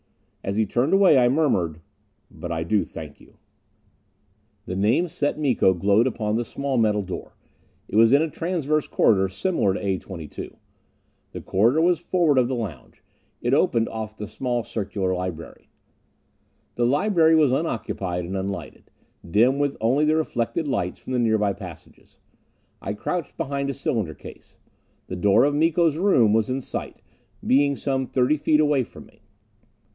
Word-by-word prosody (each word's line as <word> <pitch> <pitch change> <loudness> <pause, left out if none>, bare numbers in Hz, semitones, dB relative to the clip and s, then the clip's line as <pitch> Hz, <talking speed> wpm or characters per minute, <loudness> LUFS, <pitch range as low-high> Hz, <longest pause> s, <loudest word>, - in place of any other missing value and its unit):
As 100 - -3
he 110 +1 +2
turned 120 +8 0
away, 195 -8 +6
I 120 -1 +4
murmured, 95 - +1 0.5
"But 85 - -7
I 80 -1 -2
do 100 +4 +1
thank 80 -3 -10
you...." - - -20 1.3
The 90 - -5
name 115 - +2
Set 150 -4 -2
Miko 125 -10 +2
glowed 100 +6 +3
upon 110 -4 -2
the 120 - 0
small 135 +1 -2
metal 105 -2 +2
door. 95 -1 -7 0.5
It - - -7
was 115 +1 +6
in 140 +3 +5
a - - 0
transverse 155 -3 -1
corridor 95 -3 +2
similar 100 - 0
to - - -3
A 95 -2 0
22. 85 -6 -9 0.8
The - - -6
corridor 115 +11 +2
was 175 -1 +3
forward 165 -7 +2
of 125 - +2
the 130 - -2
lounge: 95 - -7 0.4
it 120 - +1
opened 120 -7 +2
off 110 -1 -6
the 105 - -6
small 120 +2 -2
circular 100 -4 -3
library. 90 -3 -6 1.0
The 120 0 +1
library 160 - +3
was 150 -5 +4
unoccupied 100 - -2
and 95 +3 -5
unlighted, 95 +1 -6 0.4
dim 120 +9 +3
with 145 -1 0
only 130 +7 +2
the 155 +1 +3
reflected 155 0 -1
lights 90 -10 -2
from 130 - -7
the 125 - +1
nearby 110 -3 +2
passages. 90 -5 -13 0.6
I 100 - -3
crouched 170 +9 -4
behind 140 0 -2
a 140 - -3
cylinder 110 - -2
case. - - -14 0.5
The 95 - -6
door 100 +5 +4
of 145 +1 +2
Miko's 160 +1 +2
room 130 - +3
was 110 +1 +1
in 130 +1 -2
sight, - - -7 0.4
being 140 +2 +3
some 135 -1 -2
thirty 130 +4 +1
feet 150 +1 +2
away 145 -3 +3
from - - -13
me. - - -23
120 Hz, 165 wpm, -23 LUFS, 100-145 Hz, 1.3 s, away